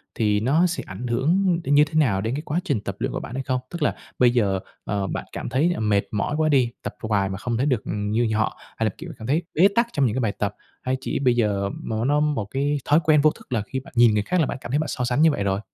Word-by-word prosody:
thì 105 Hz, -2 st, +2 dB
nó 145 Hz, +10 st, +3 dB
sẽ 175 Hz, -, -3 dB
ảnh 95 Hz, +7 st, -6 dB
hưởng 170 Hz, +9 st, +2 dB
đến 145 Hz, -2 st, +2 dB
như 145 Hz, -, +7 dB
thế 155 Hz, -, -14 dB
nào 105 Hz, -10 st, +2 dB
đến 115 Hz, +5 st, -2 dB
cái 145 Hz, -, -3 dB
quá 155 Hz, +2 st, -2 dB
trình 140 Hz, -, -1 dB
tập 100 Hz, -2 st, -5 dB
luyện -, -, -1 dB
của -, -, -3 dB
bạn -, -, -8 dB
hay 135 Hz, -, -2 dB
không? 130 Hz, 0 st, -1 dB
Tức 170 Hz, -2 st, -7 dB
là -, -, +1 dB, 0.2 s
bây 125 Hz, -1 st, +6 dB
giờ, 100 Hz, -6 st, +1 dB, 0.3 s
ờ, 100 Hz, -1 st, -1 dB
bạn -, -, -4 dB
cảm -, -, -5 dB
thấy, 145 Hz, +8 st, +2 dB
ờ, -, -, -5 dB
mệt 105 Hz, -2 st, +2 dB
mỏi 105 Hz, +7 st, -1 dB
quá 155 Hz, 0 st, +2 dB
đi, 130 Hz, -5 st, +3 dB
tập -, -, -5 dB
hoài 100 Hz, -3 st, +1 dB
mà 95 Hz, -, -4 dB
không 120 Hz, +2 st, -2 dB
thấy 130 Hz, -, +1 dB
được 130 Hz, -7 st, +1 dB
như 105 Hz, +3 st, 0 dB
họ, 110 Hz, 0 st, 0 dB, 0.2 s
hay 110 Hz, -, 0 dB
là -, -, +2 dB
kiểu 165 Hz, +1 st, -8 dB
cảm 110 Hz, -, -8 dB
thấy 155 Hz, +6 st, +1 dB
bế 180 Hz, +5 st, +6 dB
tắc 235 Hz, 0 st, +3 dB
trong 140 Hz, -3 st, +2 dB
những 110 Hz, -, 0 dB
cái 130 Hz, -, 0 dB
bài 110 Hz, -4 st, +1 dB
tập, -, -, -3 dB, 0.3 s
hay 130 Hz, +1 st, -1 dB
chỉ -, -, -2 dB
bây 125 Hz, -3 st, +3 dB
giờ 100 Hz, -4 st, +1 dB
nó 110 Hz, +1 st, -2 dB
nó 145 Hz, +2 st, +3 dB
một 150 Hz, -8 st, 0 dB
cái 145 Hz, +2 st, 0 dB
thói 150 Hz, +2 st, +5 dB
quen 150 Hz, -1 st, +4 dB
vô 155 Hz, +1 st, +5 dB
thức -, -, -17 dB
là 115 Hz, -, +1 dB
khi 130 Hz, +6 st, -4 dB
bạn 130 Hz, -, -15 dB
nhìn 120 Hz, -2 st, +6 dB
người 105 Hz, -1 st, +1 dB
khác 180 Hz, +10 st, 0 dB
là 160 Hz, -, +4 dB
bạn 135 Hz, -, -4 dB
cảm -, -, -7 dB
thấy 145 Hz, -, +2 dB
bạn 155 Hz, -, -1 dB
so 125 Hz, -, -3 dB
sánh 125 Hz, +3 st, +1 dB
như 160 Hz, -1 st, +6 dB
vậy 100 Hz, -, -2 dB
rồi? 95 Hz, 0 st, 0 dB
125 Hz, 305 wpm, -23 LUFS, 105-150 Hz, 0.3 s, như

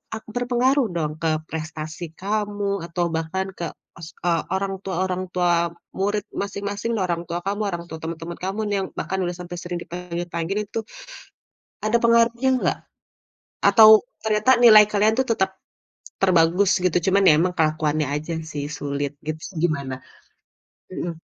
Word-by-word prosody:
ak 220 Hz, -, -8 dB
berpengaruh 245 Hz, +1 st, +2 dB
dong 150 Hz, -2 st, -1 dB
ke 160 Hz, -, +2 dB, 0.2 s
prestasi 160 Hz, +1 st, -5 dB, 0.2 s
kamu 205 Hz, -1 st, -1 dB
atau 175 Hz, 0 st, -1 dB
bahkan 185 Hz, +4 st, -2 dB
ke 170 Hz, -, -2 dB, 0.3 s
os 165 Hz, 0 st, -8 dB, 0.2 s
eee, 165 Hz, -2 st, +2 dB
orang 195 Hz, 0 st, -1 dB
tua 190 Hz, -2 st, -3 dB
orang 185 Hz, 0 st, -2 dB
tua 175 Hz, -1 st, +2 dB, 0.5 s
murid 205 Hz, +1 st, 0 dB, 0.2 s
masing-masing 200 Hz, +3 st, -3 dB
orang 170 Hz, -1 st, -1 dB
tua 170 Hz, +1 st, -2 dB
kamu 205 Hz, +2 st, -1 dB
orang 170 Hz, -2 st, -4 dB
tua 160 Hz, -, -5 dB
teman-teman 165 Hz, +1 st, -5 dB
kamu 195 Hz, +3 st, -2 dB
nih -, -, +1 dB
yang 190 Hz, -, -2 dB
bahkan 190 Hz, 0 st, -2 dB
udah 175 Hz, 0 st, -3 dB
sampai 175 Hz, 0 st, -7 dB
sering 175 Hz, 0 st, -4 dB
dipanggil-panggil 175 Hz, +1 st, -4 dB
itu, 225 Hz, -, -3 dB, 1.1 s
ada 220 Hz, +2 st, +3 dB
pengaruhnya 235 Hz, +2 st, +3 dB
nggak? -, -, 0 dB, 0.9 s
Atau 220 Hz, -2 st, +8 dB, 0.3 s
ternyata 215 Hz, +3 st, +3 dB
nilai 215 Hz, -2 st, +9 dB
kalian 210 Hz, +1 st, +3 dB
tuh 265 Hz, -, +2 dB
tetap, 190 Hz, -2 st, 0 dB, 0.7 s
terbagus 180 Hz, +1 st, +4 dB
gitu 180 Hz, -, +3 dB, 0.2 s
cuman 200 Hz, +1 st, +4 dB
ya -, -, +8 dB
emang 180 Hz, +1 st, +1 dB
kelakuannya 155 Hz, -1 st, +1 dB
aja 155 Hz, +3 st, -4 dB, 0.2 s
sih 145 Hz, -1 st, -3 dB
sulit 140 Hz, 0 st, -3 dB
gitu 155 Hz, 0 st, -3 dB, 0.2 s
gimana? 140 Hz, -5 st, -1 dB, 1.0 s
Mhm 170 Hz, -3 st, -5 dB
180 Hz, 150 wpm, -23 LUFS, 165-205 Hz, 1.1 s, nilai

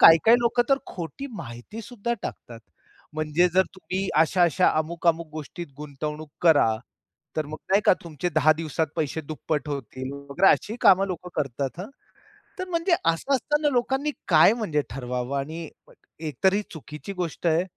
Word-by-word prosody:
काही-काही 195 Hz, +9 st, +8 dB
लोकं 240 Hz, +1 st, +3 dB
तर 275 Hz, -, +5 dB
खोटी 175 Hz, -, -6 dB
माहिती 120 Hz, -, -8 dB
सुद्धा 235 Hz, 0 st, -3 dB
टाकतात. 115 Hz, -1 st, -7 dB, 0.5 s
म्हणजे 155 Hz, +3 st, +2 dB
जर 190 Hz, -, +6 dB
तुम्ही 190 Hz, +1 st, -3 dB
अशा-अशा, 175 Hz, +2 st, +4 dB
अमुक-अमुक 165 Hz, 0 st, 0 dB
गोष्टीत 155 Hz, +3 st, -7 dB
गुंतवणूक 150 Hz, +1 st, -6 dB
करा, 145 Hz, -10 st, +5 dB, 0.6 s
तर 155 Hz, -2 st, 0 dB
मग 155 Hz, +1 st, -7 dB
नाही 200 Hz, +2 st, +5 dB
का -, -, +7 dB
तुमचे 170 Hz, +2 st, -3 dB
10 155 Hz, 0 st, +5 dB
दिवसात 160 Hz, 0 st, -2 dB
पैसे 160 Hz, 0 st, -1 dB
दुप्पट 150 Hz, 0 st, -3 dB
होतील 130 Hz, -1 st, -5 dB
वगैरे, 140 Hz, +7 st, +2 dB
अशी 220 Hz, +3 st, 0 dB
कामं 195 Hz, -2 st, +6 dB
लोकं 180 Hz, -1 st, -5 dB
करतात 140 Hz, +2 st, -2 dB
हं. 200 Hz, -, -6 dB, 0.7 s
तर 370 Hz, 0 st, -4 dB
म्हणजे 340 Hz, +1 st, +2 dB
असं 165 Hz, +12 st, +1 dB
असताना 295 Hz, +3 st, +1 dB
लोकांनी 265 Hz, +4 st, +1 dB, 0.2 s
काय 160 Hz, +6 st, +7 dB
म्हणजे 170 Hz, -11 st, 0 dB
ठरवावं? 125 Hz, +1 st, -3 dB
आणि 160 Hz, +3 st, -5 dB, 0.5 s
एक 155 Hz, -5 st, -5 dB
तरी 190 Hz, +2 st, +5 dB
ही 210 Hz, -, -1 dB
चुकीची 155 Hz, +4 st, -8 dB
गोष्ट 175 Hz, -2 st, -3 dB
आहे 165 Hz, +2 st, +3 dB
165 Hz, 155 wpm, -25 LUFS, 150-195 Hz, 0.7 s, काही-काही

